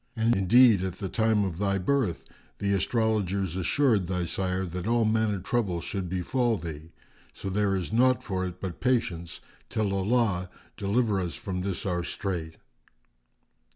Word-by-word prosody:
And 115 Hz, +1 st, +2 dB
indeed, 110 Hz, +2 st, +6 dB
at 95 Hz, -1 st, -2 dB
the 95 Hz, -1 st, -5 dB
time 110 Hz, -1 st, +2 dB
of 90 Hz, -3 st, -4 dB
thy 100 Hz, -1 st, +1 dB
birth, 105 Hz, -1 st, 0 dB, 0.3 s
the 100 Hz, 0 st, 0 dB
astrologers 100 Hz, -3 st, 0 dB
assured 105 Hz, -, +2 dB
thy 90 Hz, -1 st, -1 dB
sire 95 Hz, +2 st, -1 dB
that 90 Hz, +2 st, -5 dB
all 115 Hz, 0 st, +3 dB
manner 110 Hz, -1 st, +1 dB
troubles 95 Hz, -3 st, -1 dB
should 95 Hz, -3 st, -4 dB
befal 115 Hz, +6 st, 0 dB
thee. 80 Hz, -1 st, -8 dB, 0.4 s
So 95 Hz, -, -5 dB
there 100 Hz, 0 st, +1 dB
is 95 Hz, +2 st, -3 dB
naught 125 Hz, +1 st, +3 dB
for 95 Hz, -3 st, -2 dB
it 90 Hz, 0 st, -8 dB
but 95 Hz, -3 st, -6 dB
patience 90 Hz, -10 st, -1 dB, 0.3 s
till 105 Hz, -3 st, 0 dB
Allah 100 Hz, -2 st, +1 dB, 0.3 s
deliver 105 Hz, 0 st, +1 dB
us 85 Hz, -2 st, -3 dB
from 90 Hz, -2 st, -4 dB
this 95 Hz, -1 st, -3 dB
our 90 Hz, -2 st, -1 dB
strait." 85 Hz, -4 st, -4 dB
95 Hz, 155 wpm, -27 LUFS, 90-110 Hz, 0.4 s, indeed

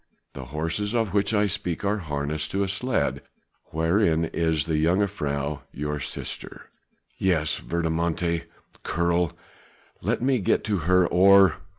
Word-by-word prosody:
The 65 Hz, -, -7 dB
horses 80 Hz, -, -2 dB
of 115 Hz, -5 st, 0 dB
which 100 Hz, 0 st, +2 dB
I 105 Hz, -1 st, +3 dB
speak 95 Hz, -2 st, -2 dB
are 105 Hz, +2 st, +1 dB
harnessed 75 Hz, -2 st, -3 dB
to 100 Hz, +1 st, +1 dB
a -, -, -1 dB
sledge 105 Hz, +5 st, 0 dB, 0.5 s
wherein 80 Hz, 0 st, +1 dB
is 80 Hz, -2 st, 0 dB
the 80 Hz, -2 st, 0 dB
jongejuffrouw 75 Hz, -6 st, 0 dB
your 75 Hz, +1 st, -3 dB
sister." -, -, -5 dB, 0.5 s
"Yes! 80 Hz, -5 st, +1 dB
verdommte 85 Hz, 0 st, -1 dB, 0.4 s
Keerl! 85 Hz, -1 st, 0 dB, 0.7 s
let 110 Hz, +6 st, 0 dB
me 130 Hz, -1 st, +2 dB
get 95 Hz, -, +1 dB
to 105 Hz, -2 st, 0 dB
her 90 Hz, -1 st, +5 dB
or...." 95 Hz, +3 st, +6 dB
85 Hz, 130 wpm, -25 LUFS, 80-100 Hz, 0.7 s, or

